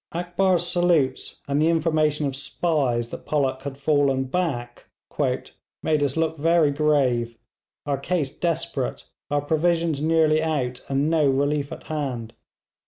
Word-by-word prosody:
Akbar's 175 +1 +1
salutes, 175 -7 +1
and 140 +1 +1
the 160 - +4
information 155 -2 +1
of 135 -2 -2
spies 135 -5 -1
that - - -7
Pollock 135 -3 0
had 135 0 -6
fallen 140 -2 +2
back, 130 -5 -3 1.0
'made 155 -2 +1
us 145 +1 0
look 160 0 0
very 165 -1 +3
grave 135 -6 +1 0.5
our 140 -2 -1
case 150 -2 -2
desperate, 165 -5 -2 0.3
our 145 0 +1
provisions 160 0 +1
nearly 155 -1 +3
out, 135 -6 -2
and 140 +3 +1
no 155 -4 +3
relief 145 +2 0
at - - -8
hand. 130 -7 -4
150 Hz, 135 wpm, -24 LUFS, 135-165 Hz, 1.0 s, the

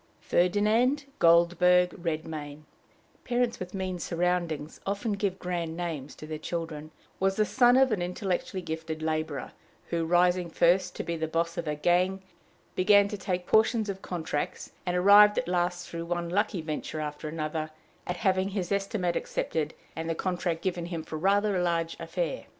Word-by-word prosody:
Ferdinand 215 +10 +2
Goldberg 180 +1 +5
Redmain 155 -4 -5 0.6
parents 245 -1 0
with 185 +1 -6
mean 185 -2 -3
surroundings 170 -3 -2
often 205 +3 -2
give 200 -2 -1
grand 170 -3 -3
names 160 -6 -4
to - - -10
their 155 0 -5
children 160 -2 -5 0.3
was 195 0 +2
the 215 - +2
son 245 +2 +4
of 265 -1 +4
an 205 -4 0
intellectually 185 +1 -2
gifted 160 -1 -5
laborer, 155 -2 -2 0.4
who, 170 -1 0
rising 175 +1 +3
first 175 +3 +2
to - - -3
be 170 - -3
boss 165 +1 -1
of 170 - -4
a 150 - -1
gang, 180 +5 +1 0.5
began 200 +2 +5
to 210 - -4
take 180 -2 -3
portions 220 0 +3
of 195 -1 -4
contracts, 160 -4 -4 0.2
and 180 0 +1
arrived 205 +3 +7
at - - 0
last, 175 0 -1
through 170 0 -5
one 170 0 -2
lucky 200 0 0
venture 155 0 -4
after 150 0 -4
another, 155 0 -3 0.4
at 180 - -2
having 190 0 +1
his 195 -3 -3
estimate 195 -3 0
accepted 155 -1 -2 0.2
and 165 +1 -4
the 165 - 0
contract 175 -2 -2
given 175 -2 -2
him 170 -2 -4
for 155 - -6
a - - -6
rather 200 +1 +2
large 165 -1 0
affair. - - -3
175 Hz, 165 wpm, -28 LUFS, 165-195 Hz, 0.6 s, arrived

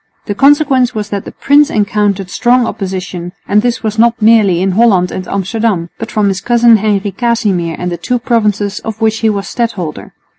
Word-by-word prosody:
The 205 - -2
consequence 270 -1 +3
was 210 -1 -4
that 200 -2 -4
the - - -8
prince 290 +1 +3
encountered 205 -3 -1
strong 245 +3 +2
opposition, 185 -4 -5
and 210 +1 +3
this 240 0 -2 0.2
not 235 +1 +3
merely 215 -5 +4
in 190 +1 0
Holland 190 -3 +2
and 185 - -6
Amsterdam, 200 -3 -2
but 225 - -5
from 210 -2 +1
his 195 0 -3
cousin 235 -1 +4
Henry 205 -1 -1
Casimir 200 -8 -1
and 180 0 -4
the 175 - -3
two 245 +9 -1
provinces 210 -4 -1
of 220 -1 -7
which 220 -1 0
he 225 - +1
was 200 -2 -3
stadholder. 200 -10 -4
210 Hz, 185 wpm, -13 LUFS, 195-235 Hz, 0.2 s, merely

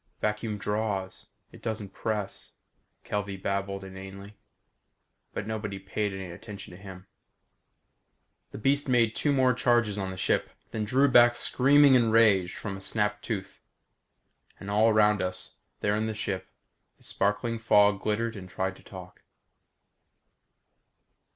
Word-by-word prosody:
"Vacuum 105 0 -2
draws. 105 -2 -3 0.2
It - - -14
doesn't 105 -4 -4
press," 105 -3 -4 0.5
Kelvey 100 -1 -3
babbled 100 0 -3
inanely, 95 +2 -10 1.0
but - - -4
nobody 105 -2 -4
paid 100 +2 -3
any 95 -2 -6
attention 100 +2 -10
to 90 +2 -12
him. 95 -1 -10 1.4
The - - -9
beast 140 +5 +1
made 115 -3 +3
two 145 - +1
more 130 -2 +3
charges 120 -4 +2
on 95 -1 -2
the 95 - -7
ship, - - 0 0.2
then 110 -1 -2
drew 130 +6 +3
back 120 -2 +6
screaming 140 +3 +5
in 120 -3 +4
rage 105 -5 +4
from 100 -3 -5
a 95 - -8
snapped 105 +1 -1
tooth. 100 -5 -5 1.0
And 100 - -6
all 110 +2 +4
around 105 -2 +4
us, 90 0 -4 0.2
there 105 0 +1
in 110 +1 -1
the 110 - -3
ship, 100 -2 -3 0.5
the - - -23
sparkling 115 +3 -1
fog 105 -3 +4
glittered 115 +2 -1
and 95 -2 -9
tried 95 +1 -3
to - - -19
talk. 90 -2 -11
105 Hz, 140 wpm, -28 LUFS, 95-115 Hz, 1.4 s, back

